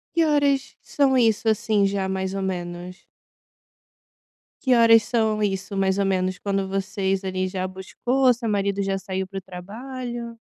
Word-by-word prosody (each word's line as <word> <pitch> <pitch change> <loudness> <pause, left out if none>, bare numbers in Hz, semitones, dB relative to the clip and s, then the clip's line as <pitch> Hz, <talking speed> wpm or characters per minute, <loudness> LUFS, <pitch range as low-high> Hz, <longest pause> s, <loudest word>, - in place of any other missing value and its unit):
Que 335 -1 +4
horas 285 -3 +1
são 275 -2 +2
isso 225 -2 +3
assim, 210 -1 +2
já, 195 -1 -1
mais 190 0 -2
ou 195 - -2
menos? 180 0 -5 1.6
Que 255 -2 +4
horas 230 -2 +6
são 220 -2 +1
isso 195 -1 -2
mais 195 0 +1
ou 200 - +2
menos 185 -1 0
quando 195 0 -1
vocês 195 0 -1
ali 185 -1 -2
já 185 0 -3
buscou, 245 +8 +1
seu 230 -1 -4
marido 200 -1 0
já 195 0 -1
saiu 190 -1 -3
pro 195 +1 -6
trabalho? 235 +6 -7
200 Hz, 155 wpm, -24 LUFS, 190-230 Hz, 1.6 s, horas